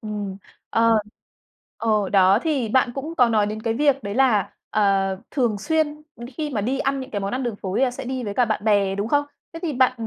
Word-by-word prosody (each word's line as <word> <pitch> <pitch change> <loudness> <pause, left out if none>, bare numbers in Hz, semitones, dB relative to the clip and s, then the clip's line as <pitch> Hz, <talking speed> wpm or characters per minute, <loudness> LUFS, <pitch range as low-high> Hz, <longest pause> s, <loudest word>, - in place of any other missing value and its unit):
Ừm. 205 -3 -5 0.3
Ờ, 230 -1 +4 0.8
ờ, 215 -3 +1
đó, 195 +1 +5
thì 280 -8 0
bạn 250 +1 +2
cũng 305 +5 -5
có 245 -2 +5
nói 215 -2 +2
đến 215 +1 -5
cái 225 -1 0
việc 280 -1 +2
đấy 200 0 -4
là, 240 -7 +3 0.2
ờ, 215 - +1 0.5
thường 235 -7 0
xuyên 305 +5 -1
đ 235 - -18 0.2
khi 305 -1 -3
mà 220 -7 -1
đi 260 +6 -1
ăn 275 0 0
những 260 - -8
cái 205 - -3
món 195 +2 -3
ăn 260 +1 -2
đường 235 -4 -3
phố 190 0 -4
thì - - +2
là 250 - 0
sẽ 250 - -7
đi 255 -1 -3
với 200 -1 -4
cả 245 - +3
bạn 215 -2 -2
bè, 200 -3 +2
đúng 200 +2 -2
không? 290 +3 +2 0.3
Thế 330 - -8
thì 325 - -1
bạn 255 -1 +3
230 Hz, 245 wpm, -23 LUFS, 210-270 Hz, 0.8 s, đó